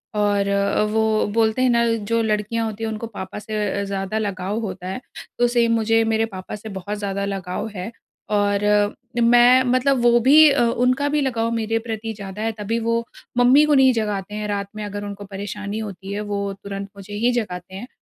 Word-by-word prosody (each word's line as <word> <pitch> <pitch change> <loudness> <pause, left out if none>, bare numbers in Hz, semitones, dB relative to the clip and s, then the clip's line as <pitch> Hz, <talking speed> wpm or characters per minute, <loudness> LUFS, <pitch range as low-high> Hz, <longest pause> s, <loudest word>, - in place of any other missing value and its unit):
और 205 -1 +1
अ, 200 +1 +1
वो 220 0 +2
बोलते 225 +2 +2
हैं 255 - +4
ना 235 0 +3 0.3
जो 230 0 +3
लड़कियाँ 215 +1 -1
होती 220 0 -5
हैं 220 - -1
उनको 220 +1 -5
पापा 200 -2 -7
से 210 0 -3
अ, - - -2
ज़्यादा 195 +1 -3
लगाव 200 +1 -2
होता 185 -4 -5
है, 190 +7 -4 0.4
तो 240 - +4
सेम 235 -1 +2
मुझे 225 0 +2
मेरे 220 0 +2
पापा 185 +2 -6
से 215 +1 -9
बहुत 205 +3 -5
ज़्यादा 200 -1 -2
लगाव 195 +1 -4
है। 185 +5 -5 0.4
और 205 -1 +1
अ, 205 0 +3 0.3
मैं 245 +2 +6
मतलब 255 0 +2
वो 240 0 +5
भी 295 +5 +7
अ, 275 - +2
उनका 250 +4 +1
भी 295 0 +1
लगाव 230 -4 0
मेरे 225 0 0
प्रति 220 0 -3
ज़्यादा 200 0 -8
है 225 - 0
तभी 225 +3 -1
वो 230 +1 0 0.3
मम्मी 255 +5 +6
को 300 - +2
नहीं 265 -1 +6
जगाते 210 -3 -2
हैं 210 0 -3
रात 200 -1 -2
में 215 - -5
अगर 205 0 -5
उनको 205 0 -7
परेशानी 205 +1 -5
होती 195 -2 -6
है, 205 - -3
वो 200 -1 -3
तुरंत 200 0 -6
मुझे 200 +1 -10
ही 245 - +4
जगाते 180 -2 -8
हैं। 225 +6 -7
215 Hz, 205 wpm, -22 LUFS, 200-230 Hz, 0.4 s, भी